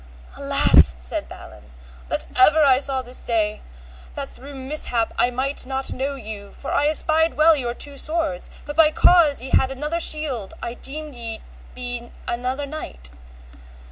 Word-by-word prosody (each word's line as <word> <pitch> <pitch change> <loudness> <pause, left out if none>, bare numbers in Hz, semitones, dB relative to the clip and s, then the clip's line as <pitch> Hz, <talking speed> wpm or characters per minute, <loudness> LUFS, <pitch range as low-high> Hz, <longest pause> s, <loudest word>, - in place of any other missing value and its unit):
Alas, 65 -2 +5
said 60 0 -2
Balan, 65 - -13 0.4
that - - -2
ever 300 +5 +6
I 265 -2 +5
saw 270 -2 -2
this 250 +1 -6
day, 215 -3 -1 0.5
that - - -5
through 280 +2 -10
mishap 260 -4 -1
I 245 - +2
might 265 +3 -2
not 265 0 -2
know 275 +2 -3
you, 210 -5 -9
for 275 - -7
I 290 - +2
espied 315 +1 +1
well 315 +1 +5
your 240 -4 -3
two 285 -1 -2
swords, 310 -4 -2 0.2
but 295 - -6
by 320 -1 +6
cause 310 -5 +4
ye 265 - -7
had 265 - +3
another 300 +5 -3
shield 295 - 0
I 235 - -5
deemed 300 +4 -7
ye 230 -2 -6
had 220 - -10 0.3
been 245 -1 -6 0.2
another 255 +4 -2
knight. 170 - -8
265 Hz, 165 wpm, -22 LUFS, 240-300 Hz, 0.5 s, ever